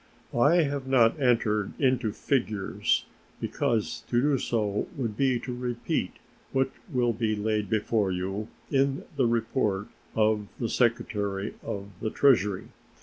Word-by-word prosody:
I 150 +8 +5
have 140 -2 -2
not 130 +1 +4
entered 110 -5 +1
into 125 -5 +2
figures, 110 -5 0 0.3
because 120 -7 -1
to 120 - +2
do 140 +1 +3
so 105 -4 -1
would 115 -6 -2
be 130 0 +2
to 125 - -4
repeat 120 -1 -2 0.4
what 135 0 +1 0.2
will 120 -3 +2
be 110 -1 0
laid 105 -1 -1
before 105 -2 +1
you 95 +4 -3 0.2
in 135 0 +2
the 130 -4 +3
report 110 -4 0 0.3
of 110 -1 +2
the 115 - -1
Secretary 105 -4 0
of 100 0 -5
the 110 - 0
Treasury. 105 -8 +3
115 Hz, 135 wpm, -28 LUFS, 105-130 Hz, 0.4 s, I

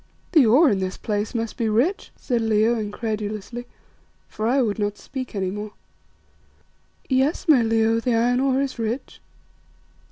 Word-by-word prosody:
"The 305 -9 +5
ore 270 +6 +5
in 200 - 0
this 185 0 -3
place 210 +2 -3
must 230 -1 -3
be 225 -2 0
rich," 265 - 0
said 240 -3 -1
Leo, 220 +1 +2
incredulously, 215 +1 -4 0.6
for 215 +1 -3
I 260 +4 +3
would 220 -5 0
not 205 0 -1
speak 255 -4 -7
any 190 -2 -1
more. 210 +1 -6 1.3
"Yes, 270 +7 +1
my 290 -6 +6
Leo, 225 0 +2
the 235 0 0
iron 245 +2 +2
ore 265 0 +2
is 270 -3 -5
rich." 230 +4 -4
225 Hz, 155 wpm, -23 LUFS, 215-255 Hz, 1.3 s, my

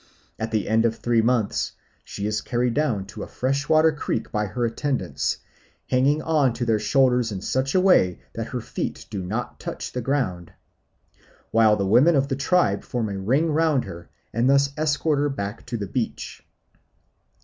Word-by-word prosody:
At 110 - -2
the 110 -2 -1
end 110 +1 +3
of 115 -1 +2
the - - -17
three 120 -1 +3
months 115 -2 0 0.3
she 100 - -6
is 105 0 -1
carried 120 -1 0
down 125 -10 0
to 100 - -9
a - - -5
freshwater 145 +5 +2
creek 145 -6 -3
by 105 0 -1
her 120 +5 -2
attendants, 130 +4 -1 0.5
hanging 140 +4 +3
on 150 -6 +2
to 120 +1 -3
their 110 -2 +2
shoulders 125 -2 +2
in 100 - -4
such 130 - -1
a - - +6
way 180 - +4
that - - -4
her - - -4
feet - - -5
do 100 -3 -3
not 110 +7 -4
touch - - -6
the 125 - -3
ground, 110 -10 -2 1.0
while 110 -2 +5
the 100 - -1
women 130 - +5
of 140 0 +1
the 135 - 0
tribe 140 - +2
form 115 -3 -2
a 100 -1 -4
ring 135 +11 +1
round 155 -3 +2
her, 85 0 -9 0.2
and 120 +3 +2
thus 140 0 +3
escort 150 -1 +1
her 135 -9 -1
to 120 - -3
the 105 - -3
beach. 110 +4 -4
125 Hz, 180 wpm, -24 LUFS, 105-140 Hz, 1.0 s, a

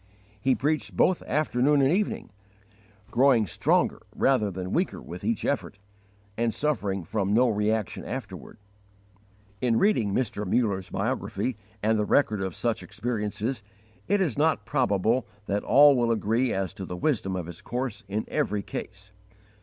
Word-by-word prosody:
He 130 +2 +3
preached 150 +3 -1
both 185 - +3
afternoon 145 -1 +2
and 135 0 +4
evening, 200 +4 -1 0.8
growing 125 -3 +4
stronger - - +1
rather 125 -6 +2
than 95 0 -5
weaker 180 +3 0
with - - -9
each 230 -1 -1
effort, 140 -7 -2 0.6
and 115 +1 +1
suffering 105 - -1
from 100 +3 -1
no 125 +2 +5
reaction 105 0 -1
afterward. - - -7 1.0
In 120 -3 +2
reading 120 - +2
Mr. 105 -2 -1
Muller's 95 -3 0
biography 130 - -2 0.3
and 110 0 +2
the 105 - +1
record 105 -5 +2
of 95 -3 -3
such 115 -2 -1
experiences, 110 0 -3 0.5
it 200 0 +2
is 150 -8 0
not 160 +1 +2
probable 120 -2 +1 0.2
that 100 0 -1
all 145 +1 +7
will 120 -2 +2
agree 115 +3 +1
as 95 -1 -2
to 95 -2 -7
the 90 - -5
wisdom 100 - 0
of 90 -2 -3
his 85 -1 -9
course 125 -2 -4
in 105 +2 -2
every 105 -1 -1
case. 100 0 -7
115 Hz, 150 wpm, -27 LUFS, 100-135 Hz, 1.0 s, all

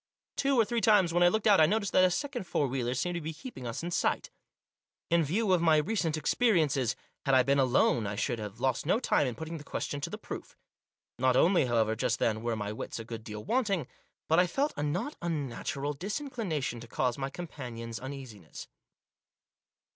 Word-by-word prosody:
Two 275 -2 +2
or 225 - +5
three 235 +1 -1
times 195 -7 +4
when 175 - +2
I 175 - +7
looked 220 +4 +1
out 205 -5 +6
I 155 - +7
noticed 200 0 0
that 185 - +5
a 185 - +6
second 245 +1 -3
four 145 - +1
wheeler 125 -2 -1
seemed 175 +7 -1
to 175 - -3
be 160 +1 -5
keeping 150 - -8
us 115 +7 -4
in 175 - -3
sight. - - 0 0.8
In 170 -1 +4
view 190 +6 +1
of 180 - +3
my 160 -2 +5
recent 165 -1 0
experiences, 155 - +2 0.3
had 135 - +5
I 130 - +6
been 140 +2 +2
alone 125 -4 +3
I 100 - -3
should 120 +2 -1
have 105 +1 -7
lost 130 +2 0
no 205 - +3
time 145 - +2
in 125 - -3
putting 160 0 -6
the - - -10
question 145 0 -4
to - - -3
the - - -5
proof. - - -8 0.6
Not 130 0 +3
only, 170 -1 +4
however, 110 -2 +2
just - - 0
then, 110 -1 0
were 115 0 -1
my 105 -1 -3
wits - - -6
a 115 - -6
good 115 -1 -7
deal 105 -1 -7
wanting, 205 - 0 0.4
but 160 +2 +4
I 180 - +4
felt 280 - 0
a - - -3
not 175 - -2
unnatural 145 -3 -3
dis 190 - -3
inclination 195 - -3
to 120 - -10
cause 125 +2 -1
my 135 0 -2
companions 120 -8 -7
uneasiness. 130 - -9
150 Hz, 210 wpm, -30 LUFS, 125-185 Hz, 0.8 s, I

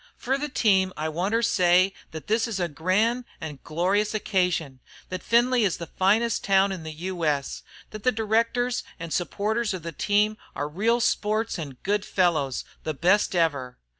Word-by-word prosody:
"Fer 260 +2 0
the 295 +2 -3
team 190 -7 +2
I 155 +1 -2
wanter 195 +9 0
say 185 -1 +4 0.2
thet 160 -1 -8
this 225 +2 +1
is 215 -4 -3
a 175 - 0
gran' 190 +10 +1 0.2
an' 150 -3 -7
glorious 195 +7 0
occasion, 180 -10 0 0.3
thet 185 -1 -4
Findlay 240 +2 +3
is 195 -5 +1
the 170 - -6
finest 210 +7 +1
town 195 0 +3
in 190 -3 -5
the 160 0 -6
U. 175 +2 -5
S., 145 -3 -1 0.3
thet 215 - -7
the 255 - +3
directors 230 +2 0 0.2
an' 165 -1 -6
supporters 210 +5 -1
of 175 - -8
the 165 - -5
team 210 +6 +1 0.2
are 145 - -2
real 220 +10 +1
sports 215 -2 0
an' 140 -5 -7
good 205 0 0
fellows, 160 -10 0 0.2
the 155 -1 -3
best 185 +6 +2
ever! 140 -7 0
190 Hz, 175 wpm, -25 LUFS, 165-220 Hz, 0.3 s, say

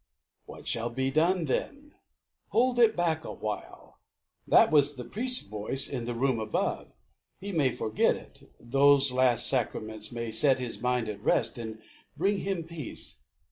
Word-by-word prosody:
"What - - -11
shall 115 +1 0
be 130 +3 -2
done, 170 +4 +2
then?" 285 - -4 0.5
"Hold 245 +1 +1
it 225 -2 +5
back 165 -2 0
awhile. 110 -7 -7 0.5
That - - +5
was 145 -1 +4
the 125 - -7
priest's 245 - 0
voice 110 +6 -1
in 125 -4 -4
the 120 0 -4
room 130 -1 0
above. 110 -1 -2 0.5
He 200 +1 -6
may 150 -7 +2
forget 110 -3 0
it. - - -15
Those 140 +2 +4
last 125 -2 +4
sacraments 110 -4 -1
May 115 -1 -5
set 135 +4 +4
his 125 -2 -5
mind 125 -2 0
at 105 -1 -6
rest, - - 0
and 110 -1 -8 0.3
bring 195 +5 +1
him 190 -4 -3
peace." 160 -5 -6
135 Hz, 155 wpm, -28 LUFS, 115-165 Hz, 0.5 s, it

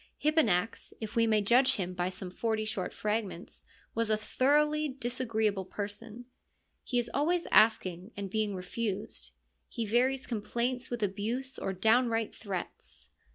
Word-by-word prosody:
Hipponax, 230 - +2
if 220 0 -6
we 230 -1 +4
may 215 -2 +3
judge 255 +5 +5
him 185 -2 -3
by 180 0 -1
some 185 0 -7
forty 220 +2 -1
short 205 -4 -2
fragments, 210 -4 -3 0.3
was 230 -1 0
a 215 - +3
thoroughly 300 +6 +2
disagreeable 230 -6 -1
person; 210 +5 -6 0.6
he 245 - -1
is 240 -1 0
always 335 +5 +1
asking 185 -4 +4
and 200 -1 -3
being 210 0 -1
refused; 185 - -4 0.4
he 230 - -3
varies 255 +5 +2
complaints 240 +3 -2
with 240 -3 -2
abuse 225 +7 -2
or 195 - -2
downright 225 +3 +2
threats. 195 -5 -6
220 Hz, 140 wpm, -31 LUFS, 200-245 Hz, 0.6 s, judge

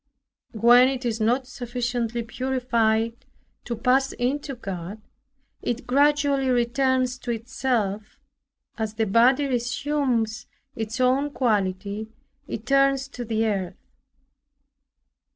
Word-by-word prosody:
When 240 +3 +6
it 265 -1 -3
is 225 -2 -1
not 245 +4 +2
sufficiently 240 -2 -3
purified 230 -2 0 0.4
to 240 - -3
pass 260 +3 +2
into 275 +3 -2
God, 195 -2 -6 0.6
it 240 +1 -3
gradually 280 0 +2
returns 255 +1 +1
to 245 - -8
itself; 225 -3 -2 0.6
as 220 -1 -3
the 220 0 +1
body 245 +7 +4
resumes 245 -2 -1 0.3
its 225 +1 -4
own 260 +3 +2
quality, 210 -4 -1 0.4
it 225 - -6
turns 275 0 +3
to 250 -3 -6
the 225 -1 0
earth. 190 -4 -3
240 Hz, 105 wpm, -24 LUFS, 220-260 Hz, 0.6 s, When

